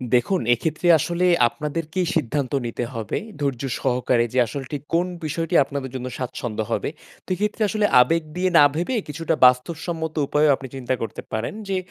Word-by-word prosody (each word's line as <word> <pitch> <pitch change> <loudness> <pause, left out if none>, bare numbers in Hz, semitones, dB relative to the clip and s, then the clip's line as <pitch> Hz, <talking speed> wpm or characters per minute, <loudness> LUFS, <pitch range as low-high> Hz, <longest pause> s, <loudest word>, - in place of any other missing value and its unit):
দেখুন 175 +10 +2
এক্ষেত্রে 155 +7 -1
আসলে 170 +4 0 0.2
আপনাদেরকেই 155 +7 -3
সিদ্ধান্ত 145 -3 -1
নিতে 120 +1 -3
হবে, 110 -4 -3 0.2
ধৈর্য 140 -4 -1 0.2
সহকারে 125 -2 +1
যে 130 - +2
আসলটি 135 +3 -5 0.2
কোন 175 +2 +2 0.2
বিষয়টি 165 +2 -2
আপনাদের 135 -1 -5
জন্য 130 0 -4
স্বাচ্ছন্দ্য 120 -3 -3
হবে। - - -1 0.3
তো - - -63
এক্ষেত্রে 210 +4 -2
আসলে 210 +1 +1 0.2
আবেগ 165 +5 +2
দিয়ে 185 +1 +1
না - - +8
ভেবে 175 +11 -1
কিছুটা 165 +2 -1
বাস্তবসম্মত 160 +5 +1
উপায়ও 150 0 +4
আপনি 130 - -9
চিন্তা 130 -1 -2
করতে 115 - -5
পারেন, 110 +1 -2 0.2
যে 190 - +1
150 Hz, 160 wpm, -23 LUFS, 125-165 Hz, 0.3 s, না